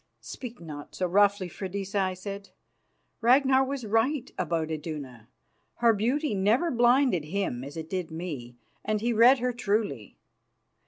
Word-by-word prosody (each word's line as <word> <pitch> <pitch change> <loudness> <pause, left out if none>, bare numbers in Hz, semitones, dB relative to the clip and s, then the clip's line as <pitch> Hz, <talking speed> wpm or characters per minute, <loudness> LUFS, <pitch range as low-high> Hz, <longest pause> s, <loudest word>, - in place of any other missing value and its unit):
"Speak 245 -2 -8
not 150 -3 -9
so 185 - -1
roughly, 200 +1 +3
Freydisa," 195 +3 -4
I 185 -1 0
said. 200 +2 -7 0.7
"Ragnar 265 +2 +5
was 270 -2 -4
right 235 +6 0
about 165 -3 -1
Iduna. 145 -7 -6 0.5
Her 235 -1 +4
beauty 250 +7 0
never 215 - +2
blinded 245 - +3
him 160 -8 -2
as 140 +3 -8
it 160 -1 -5
did 185 -1 -3
me, 150 -8 -6 0.3
and 215 0 0
he 235 +2 0
read 240 +4 +7
her 250 0 -1
truly. 205 - -2
200 Hz, 145 wpm, -27 LUFS, 165-240 Hz, 0.7 s, read